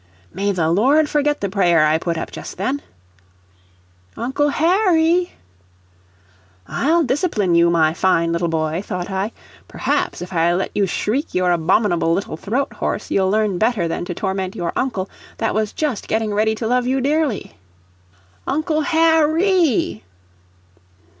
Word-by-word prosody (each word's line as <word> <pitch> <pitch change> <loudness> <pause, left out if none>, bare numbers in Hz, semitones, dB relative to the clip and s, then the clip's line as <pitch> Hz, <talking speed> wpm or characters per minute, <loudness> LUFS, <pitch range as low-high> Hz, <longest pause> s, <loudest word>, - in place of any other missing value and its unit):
May 200 +3 0
the 165 -4 0
Lord 275 - +3
forget 295 0 0
the 200 - 0
prayer 175 -5 +3
I 155 +1 +2
put 170 0 -2
up - - -5
just - - -8
then! 260 +10 -2 1.4
"Uncle 265 +5 0
Harry!" 345 +1 +2 1.3
"I'll 330 +4 +1
discipline 255 - 0
you, 170 0 +5
my 160 -2 +3
fine 170 -2 +1
little 170 +1 0
boy," 160 +1 -1
thought 180 -2 -5
I. 190 +3 -2 0.4
"Perhaps, - - -2
if 180 +1 -9
I 170 0 +2
let 190 - -2
you 200 -1 +1
shriek 245 - -2
your 180 -1 +2
abominable 175 0 +2
little 195 -5 -3
throat 245 - -2
hoarse, - - -3
you'll 190 -1 +2
learn 210 -3 +1
better 220 -6 +1
than 165 - -3
to 175 - -5
torment 190 0 -3
your 175 -5 -3
uncle, 220 -8 -2 0.3
that 225 - -1
was 215 -1 -1
just 290 -8 -3
getting 220 -1 -1
ready 220 +1 +1
to 225 - -5
love 250 +2 +1
you 265 +1 +1
dearly." 285 -3 -1 0.9
"Uncle 310 +1 0
Har 320 -1 +3
RAY!" 335 - +1
210 Hz, 150 wpm, -20 LUFS, 175-290 Hz, 1.4 s, you